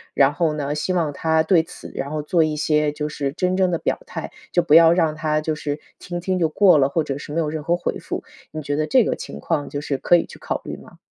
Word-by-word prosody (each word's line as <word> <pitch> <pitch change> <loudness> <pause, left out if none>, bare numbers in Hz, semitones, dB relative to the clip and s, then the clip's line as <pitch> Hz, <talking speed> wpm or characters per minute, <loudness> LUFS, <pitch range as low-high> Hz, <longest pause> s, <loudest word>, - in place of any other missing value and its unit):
然 140 0 +4
后 160 0 +1
呢， 145 -1 -2
希 150 +5 -1
望 160 -5 0
他 160 +1 +1
对 165 0 +4
此， - - -11
然 140 - -4
后 155 -1 -3
做 165 +1 +2
一 155 -1 -1
些 150 0 +1
就 150 0 -4
是 140 -2 -3
真 180 +2 0
正 190 -1 +3
的 170 - +1
表 - - -1
态， - - -6 0.2
就 175 - +2
不 155 - +2
要 165 0 +8
让 165 -3 +2
他 155 0 0
就 155 0 -1
是 150 -1 -4 0.2
听 175 -1 -5
听 185 +1 -1
就 165 -2 +2
过 180 -3 +5
了， 135 - +3
或 160 +3 0
者 140 -1 -4
是 145 - -9
没 165 - 0
有 155 -2 0
任 155 -1 -4
何 170 +3 +2
回 - - -3
复。 - - -5 0.3
你 155 0 -6
觉 145 0 -2
得 155 +1 0
这 255 -2 +5
个 - - 0
情 - - -8
况， 155 -4 -2
就 145 - -4
是 140 -2 -2
可 - - +4
以 170 - +2
去 - - -14
考 - - -3
虑 - - -5
吗？ - - -16
155 Hz, 300 characters per minute, -22 LUFS, 150-170 Hz, 0.3 s, 要